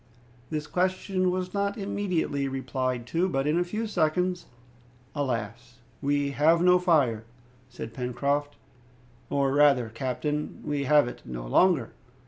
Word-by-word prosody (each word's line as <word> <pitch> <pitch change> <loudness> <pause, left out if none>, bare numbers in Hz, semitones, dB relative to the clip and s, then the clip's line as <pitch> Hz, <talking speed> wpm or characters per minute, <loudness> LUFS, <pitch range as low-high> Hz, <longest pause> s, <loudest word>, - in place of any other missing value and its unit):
This 150 -1 -3
question 185 +2 0
was 185 0 -2
not 200 +1 -1
immediately 185 -8 -1
replied 130 -2 -2
to. 170 +8 0
But, 135 -4 -1
in 155 +3 +2
a - - +2
few 215 +6 -3
seconds 180 -1 0 0.7
"Alas! 120 -3 -4 0.2
we 145 0 +1
have 155 +4 +4
no 180 +1 +5
fire," 145 -11 +2 0.5
said 115 -2 -8
Pencroft, 140 +4 -1 0.7
"or 140 -1 +1
rather, 140 -5 +4
captain, 135 +6 -3
we 145 -1 -1
have 145 -1 +5
it 120 - -8
no - - -6
longer!" 135 - +3
145 Hz, 130 wpm, -27 LUFS, 130-180 Hz, 0.7 s, no